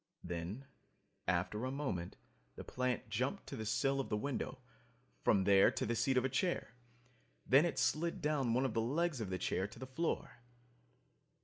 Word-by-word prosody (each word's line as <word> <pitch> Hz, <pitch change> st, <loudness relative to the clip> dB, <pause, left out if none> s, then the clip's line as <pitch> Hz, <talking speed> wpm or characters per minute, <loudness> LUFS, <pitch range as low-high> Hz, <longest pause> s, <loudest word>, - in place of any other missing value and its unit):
Then, 90 Hz, +9 st, -5 dB, 0.6 s
after 90 Hz, +5 st, 0 dB
a 130 Hz, -, -1 dB
moment, 130 Hz, -12 st, -3 dB, 0.4 s
the -, -, -7 dB
plant 125 Hz, -2 st, -1 dB
jumped -, -, -2 dB
to -, -, -6 dB
the 110 Hz, -, -4 dB
sill 135 Hz, +5 st, +1 dB
of 135 Hz, -, -2 dB
the 105 Hz, -, +1 dB
window, 140 Hz, +3 st, -3 dB, 0.7 s
from 100 Hz, -3 st, +4 dB
there 100 Hz, 0 st, +6 dB
to -, -, -2 dB
the 120 Hz, -, 0 dB
seat 130 Hz, +3 st, +2 dB
of 125 Hz, -, +3 dB
a -, -, +4 dB
chair. 135 Hz, 0 st, -1 dB, 0.7 s
Then 140 Hz, +5 st, +6 dB
it 170 Hz, -, -1 dB
slid 165 Hz, +2 st, +1 dB
down 140 Hz, -6 st, +1 dB
one 130 Hz, +2 st, +2 dB
of 130 Hz, -, -1 dB
the 115 Hz, -, +1 dB
legs 150 Hz, +3 st, 0 dB
of 105 Hz, -, -3 dB
the 95 Hz, -, -1 dB
chair 95 Hz, +1 st, -1 dB
to -, -, -14 dB
the 130 Hz, -, -6 dB
floor. 140 Hz, 0 st, -2 dB
125 Hz, 185 wpm, -36 LUFS, 105-140 Hz, 0.7 s, there